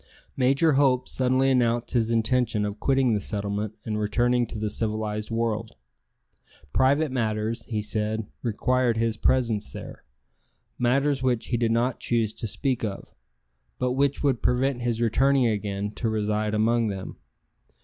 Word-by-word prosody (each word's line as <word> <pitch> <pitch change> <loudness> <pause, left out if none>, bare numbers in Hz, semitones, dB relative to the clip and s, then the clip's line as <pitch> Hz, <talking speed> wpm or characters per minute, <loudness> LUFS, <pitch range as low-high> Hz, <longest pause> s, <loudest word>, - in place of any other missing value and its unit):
Major 135 +5 +3
Hope 135 -3 +3
suddenly 130 +1 +1
announced 120 -2 +1
his 115 -2 +1
intention 115 -1 +1
of 105 +1 -5
quitting 135 -2 +2
the 105 - +1
settlement 100 +1 -3
and 105 -1 -2
returning 120 +3 +1
to - - -7
the 105 -1 -2
civilized 105 -1 -2
world. 115 -1 -2 1.0
Private 140 +3 +3
matters, 110 -2 -1
he 105 -3 -3
said, 110 +1 -1 0.2
required 120 +1 +1
his 115 -1 +1
presence 115 - +1
there - - -9 0.8
matters 135 +3 +2
which 125 -3 0
he 120 - +1
did 115 -1 +1
not 120 +2 +1
choose 115 -3 0
to 115 - -5
speak 130 +3 -2
of, 100 -3 -5 0.6
but 125 - 0
which 140 +2 0
would 135 -4 +1
prevent 125 0 +1
his 120 -1 -1
returning 130 +3 +3
again 105 -2 -1
to 115 +1 -2
reside 105 0 -1
among 115 +2 +2
them. 95 -2 -5
115 Hz, 150 wpm, -25 LUFS, 110-125 Hz, 1.0 s, Major